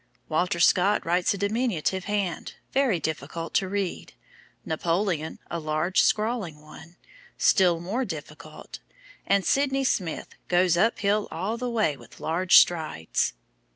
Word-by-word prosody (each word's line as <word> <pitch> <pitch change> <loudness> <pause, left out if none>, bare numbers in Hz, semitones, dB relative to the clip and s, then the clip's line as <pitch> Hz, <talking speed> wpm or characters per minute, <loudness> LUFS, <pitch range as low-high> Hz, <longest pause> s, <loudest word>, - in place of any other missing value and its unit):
Walter 170 +2 0
Scott 190 +4 +3
writes 175 +2 +2
a - - -6
diminutive 200 -3 -1
hand, 200 -4 -3 0.2
very 265 -9 +2
difficult 160 +2 -4
to 190 - +1
read, 200 -2 -3 0.5
Napoleon 165 0 -1
a 170 - -2
large 155 +4 +1
scrawling 215 -8 0
one, 160 +2 -14 0.4
still 180 -4 +4
more 200 +10 -2
difficult, 160 - -9 0.5
and 195 -2 +2
Sydney 275 +2 +1
Smith 180 -10 -1 0.2
goes 175 -1 +3
up 220 +7 +2
hill 205 +1 +1
all 190 +7 -3
the 250 +1 -3
way 215 -11 +1
with - - -16
large 175 +3 +4
strides." 155 - +2
180 Hz, 130 wpm, -26 LUFS, 165-210 Hz, 0.5 s, still